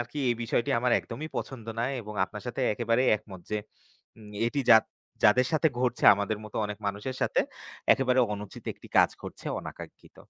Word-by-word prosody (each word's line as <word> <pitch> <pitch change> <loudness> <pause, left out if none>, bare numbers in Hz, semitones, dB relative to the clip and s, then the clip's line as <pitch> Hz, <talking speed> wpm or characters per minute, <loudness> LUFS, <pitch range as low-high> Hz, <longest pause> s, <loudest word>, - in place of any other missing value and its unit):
আরকি 120 +5 -5
এই - - +2
বিষয়টি 120 +4 0
আমার 125 -1 +2
একদমই 145 +7 -7
পছন্দ 115 -4 -5
না। 115 - +1 0.2
এবং 105 -1 -8
আপনার 105 +2 -9
সাথে 125 +2 -4
একেবারেই 120 +3 +2
একমত 95 -4 -12
যে 105 - 0 0.6
উম 105 -1 -13 0.2
এটি 140 +4 -1
যাদ 110 -1 +8 0.4
যাদের 125 +5 +6
সাথে 160 0 +3
ঘটছে 125 -1 0
আমাদের 100 +1 -2
মত 105 - -11
অনেক 105 0 -6
মানুষের 105 +6 -3
সাথে, - - +2 0.5
একেবারে 130 -1 +2
অনুচিত 105 -1 -8
একটি - - -16
কাজ - - +6
করছে - - -9
অনাকাঙ্ক্ষিত। - - -10
115 Hz, 175 wpm, -28 LUFS, 105-125 Hz, 0.6 s, যাদ